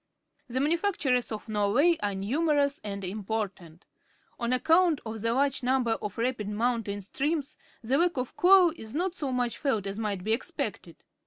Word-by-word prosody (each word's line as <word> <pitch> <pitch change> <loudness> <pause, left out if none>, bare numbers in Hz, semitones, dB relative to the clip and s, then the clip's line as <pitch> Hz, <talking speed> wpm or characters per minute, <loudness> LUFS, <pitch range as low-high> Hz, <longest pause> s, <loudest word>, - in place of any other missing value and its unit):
The 255 +1 -2
manufactures 300 - +1
of 215 0 -6
Norway 220 +11 +3
are 205 -1 -1
numerous 285 +7 +1
and 200 -1 -5
important. 195 -4 -5 0.5
On 235 0 -1
account 325 +4 +3
of 220 -1 -5
the 230 +1 +1
large 270 +2 +1
number 250 -2 +1
of 210 -2 -3
rapid 230 -3 -1
mountain 215 -2 -1
streams, 280 - -2 0.3
the 260 +6 +1
lack 345 -3 +2
of 255 -1 -3
coal 365 -1 +6
is 220 -3 -9
not 355 +2 0
so 285 -7 -3
much 245 -2 -1
felt 225 -9 0
as 195 +2 -4
might 205 -4 -2
be 220 +3 +1
ex 235 - -2
pected. - - -5
245 Hz, 170 wpm, -28 LUFS, 210-290 Hz, 0.5 s, coal